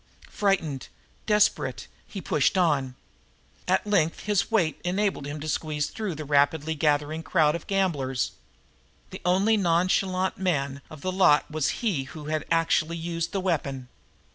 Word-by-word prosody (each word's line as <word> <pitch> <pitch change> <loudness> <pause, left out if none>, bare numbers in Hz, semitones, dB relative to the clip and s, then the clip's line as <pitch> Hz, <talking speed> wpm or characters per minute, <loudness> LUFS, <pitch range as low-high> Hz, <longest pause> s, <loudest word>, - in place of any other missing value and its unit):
Frightened, 165 -10 0 0.4
desperate, 210 -1 +2 0.2
he 195 - -7
pushed 150 +4 +1
on. 140 -8 +1 0.7
At - - +2
length 180 -6 +1
his 205 -2 0
weight 190 -9 +1
enabled 190 -5 -1
him 145 +1 -5
to 155 - -5
squeeze 150 -1 -2
through 210 -6 -4
the 155 0 -6
rapidly 145 +2 +2
gathering 150 +1 0
crowd 155 -3 +2
of 170 - -6
gamblers. 150 -10 0 0.8
The - - -8
only 195 +5 +3
nonchalant 185 +1 +1
man 140 -7 -1
of 155 -2 -11
the 185 - -2
lot 180 -5 +4
was 155 -2 0 0.2
he 160 -12 0
who 150 +2 -10
had 155 0 -2
actually 165 0 +1
used 170 0 -3
the 200 - -1
weapon. 140 -8 -2
165 Hz, 145 wpm, -26 LUFS, 150-185 Hz, 0.8 s, lot